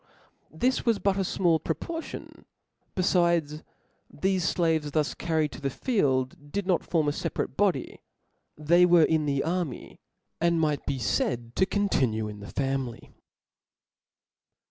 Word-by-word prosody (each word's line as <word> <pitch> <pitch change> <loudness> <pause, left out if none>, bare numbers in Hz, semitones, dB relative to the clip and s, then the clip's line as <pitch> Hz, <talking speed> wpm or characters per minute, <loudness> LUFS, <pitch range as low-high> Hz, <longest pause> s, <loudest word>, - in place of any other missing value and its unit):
This 250 +12 0
was 230 -3 +2
but 200 -1 +1
a - - 0
fmall 175 -4 +1
pro* 160 - -1
?'§9« - - -37
portion: 330 -1 -7 0.5
befides, 170 -5 +2 0.5
thefe 190 +4 0
flaves 160 -4 0
thus 155 -2 +1
carried 160 -3 -1
to - - -10
the 140 - 0
field, 145 - -1
did 200 +3 -2
not 185 -3 +1
form 160 -4 0
a - - +3
feparate - - -3
body; - - 0 0.6
they 170 +4 +4
were 175 -2 +6
in 155 -2 +1
the 140 -1 0
army, 170 -4 -3 0.4
and 170 0 +2
might 150 -2 0
be 135 - -1
faid 120 +1 -1
to 190 - +2
continue 130 - 0
in 105 -1 -8
the 100 - -9
family. 135 -3 -3
160 Hz, 145 wpm, -27 LUFS, 140-180 Hz, 0.6 s, were